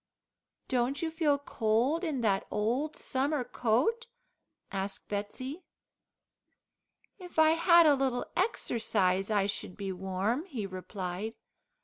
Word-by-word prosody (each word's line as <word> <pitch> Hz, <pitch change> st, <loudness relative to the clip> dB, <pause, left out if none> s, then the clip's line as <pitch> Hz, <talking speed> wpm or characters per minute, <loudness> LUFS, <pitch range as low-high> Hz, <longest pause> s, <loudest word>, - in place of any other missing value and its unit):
"Don't 255 Hz, +4 st, 0 dB
you 325 Hz, -, -1 dB
feel 310 Hz, -3 st, +2 dB
cold 255 Hz, +4 st, +1 dB
in 300 Hz, -7 st, -1 dB
that 200 Hz, -4 st, +1 dB
old 240 Hz, +9 st, -1 dB
summer 275 Hz, +1 st, -1 dB
coat?" 255 Hz, -, +1 dB, 0.6 s
asked 195 Hz, 0 st, -4 dB
Betsey. 255 Hz, -, -4 dB, 1.6 s
"If 360 Hz, -2 st, -11 dB
I 315 Hz, 0 st, +6 dB
bad 340 Hz, 0 st, +6 dB
a 300 Hz, -, +7 dB
little 265 Hz, -3 st, 0 dB
exercise, 220 Hz, -, +1 dB
I 205 Hz, -2 st, +2 dB
should 195 Hz, -2 st, -4 dB
be 195 Hz, -2 st, -3 dB
warm," 190 Hz, -, -1 dB
he 245 Hz, -, -4 dB
replied. 185 Hz, +2 st, -5 dB
245 Hz, 115 wpm, -30 LUFS, 200-305 Hz, 1.6 s, a